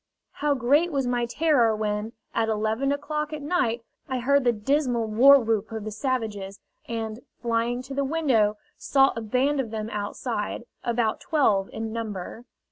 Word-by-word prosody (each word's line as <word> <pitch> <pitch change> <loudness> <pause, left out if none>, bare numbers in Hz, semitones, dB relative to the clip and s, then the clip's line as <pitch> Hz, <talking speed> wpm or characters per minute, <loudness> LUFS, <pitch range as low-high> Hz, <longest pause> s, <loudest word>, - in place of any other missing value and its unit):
How 295 -1 0
great 285 +7 +3
was 275 -3 0
my 245 -1 0
terror 245 -5 +3
when, 210 +1 -2 0.2
at 225 -1 +1
eleven 220 +5 0
o'clock 300 +1 -2
at 300 -1 -5
night, 250 -8 0 0.3
I 260 - -1
heard 275 +2 +2
the 240 - +5
dismal 245 +1 0
warwhoop 225 -2 +5
of 220 -1 -4
the 215 - -5
savages, 215 -5 -3 0.3
and, 225 -1 -4 0.2
flying 235 +1 -1
to 270 - -8
the 280 +1 0
window, 265 -9 +2 0.2
saw 270 -1 +3
a 230 - -3
band 260 +6 +1
of 250 -4 -1
them 220 0 -4
outside, 210 +2 -3 0.2
about 230 -2 0
twelve 215 -11 +2
in 220 0 -5
number. 220 0 -5
235 Hz, 160 wpm, -25 LUFS, 220-275 Hz, 0.3 s, the